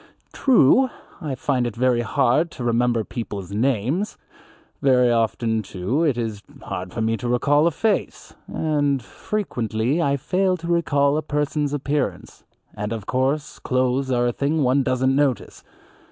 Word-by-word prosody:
True, 260 - +4 0.3
I 145 -5 -3
find 125 -2 0
it 115 - -6
very 125 0 +2
hard 125 +7 +2
to 125 - -6
remember 120 -1 +1
people's 100 -5 -6
names; 130 - 0 0.6
very 125 -3 +4
often, 115 -1 +1
too, 100 - -2
it 145 -7 +1
is 110 -4 -3 0.2
hard 90 0 -5
for 115 - -4
me 115 0 +1
to 120 0 -4
recall 145 +6 +3
a - - +5
face, 205 +6 -2
and 145 -4 0
frequently 125 - -2
I 140 -3 +1
fail 185 +6 0
to 170 0 -8
recall 145 -4 +2
a - - 0
person's 150 -1 -1
appearance, 145 -1 -3 0.3
and 105 +1 -4
of 110 -3 -4
course 135 +3 -1
clothes 130 +1 0
are 120 -1 +2
a 120 - 0
thing 145 +4 0
one 130 +2 +3
doesn't 130 0 +1
notice. 140 -3 -1
130 Hz, 155 wpm, -22 LUFS, 120-150 Hz, 0.6 s, a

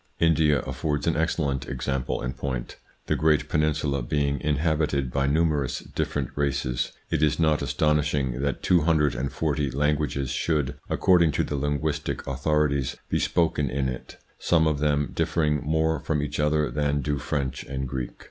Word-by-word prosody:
India 80 -3 +3
affords 75 -2 -2
an 85 - +1
excellent 75 -5 -1
example 65 -1 -2
in 65 0 -2
point. 65 -1 -4 0.3
The - - +1
great 75 -1 +2
peninsula 75 -3 0
being 70 +2 0
inhabited 75 -2 0
by 70 +1 +1
numerous 75 -2 +1
different 70 -4 -3
races, 70 -3 -1 0.2
it - - +1
is 75 +1 +2
not 80 -2 +3
astonishing 70 -2 +1
that 70 0 -2
two 90 -2 +4
hundred 75 -3 +2
and 65 +1 -3
forty 75 -3 -1
languages 70 -1 0
should, 75 -4 0 0.2
according 85 -5 +4
to - - +1
the 75 - -3
linguistic 75 +2 -2
author 75 +3 +1
ities, 70 -2 -2 0.2
be - - +2
spoken 80 -5 +1
in 65 +1 -1
it, 65 -1 -7 0.2
some 80 -2 +3
of 75 -2 +1
them 75 -1 +1
differing 75 -3 +1
more 80 +1 +1
from 75 +2 -1
each 75 - -4
other 75 0 +2
than 75 -1 0
do 70 +1 -1
French 65 -2 -2
and 65 0 -4
Greek. 60 0 -3
75 Hz, 165 wpm, -26 LUFS, 70-75 Hz, 0.3 s, two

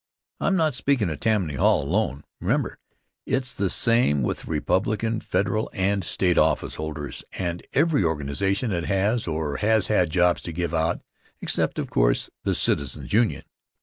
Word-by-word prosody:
I'm 195 - +1
not 160 -5 +2
speakin' 125 -8 +1
of 75 - -5
Tammany 105 -9 +1
Hall 65 - +3
alone, 75 -3 -1 0.2
remember! - - -1 0.5
It's 130 -1 -1
the 100 -5 -1
same 115 - +3
with - - -1
the - - -8
Republican 110 +3 0
Federal 110 +2 -1
and 100 0 0
State 90 +1 +1
officeholders, 75 -1 -1
and 85 -2 -3
every 150 - +3
organization 85 - 0
that 85 -3 -1
has 105 +3 0
or 80 -3 -2
has 110 0 +2
had 90 -5 +3
jobs 90 +1 +2
to 85 - -6
give 85 0 -3
out 80 +1 0 0.4
except, - - 0
of - - -3
course, - - +2
the - - +1
Citizens' 70 +5 0
Union. 115 0 +2
95 Hz, 155 wpm, -24 LUFS, 80-110 Hz, 0.5 s, Hall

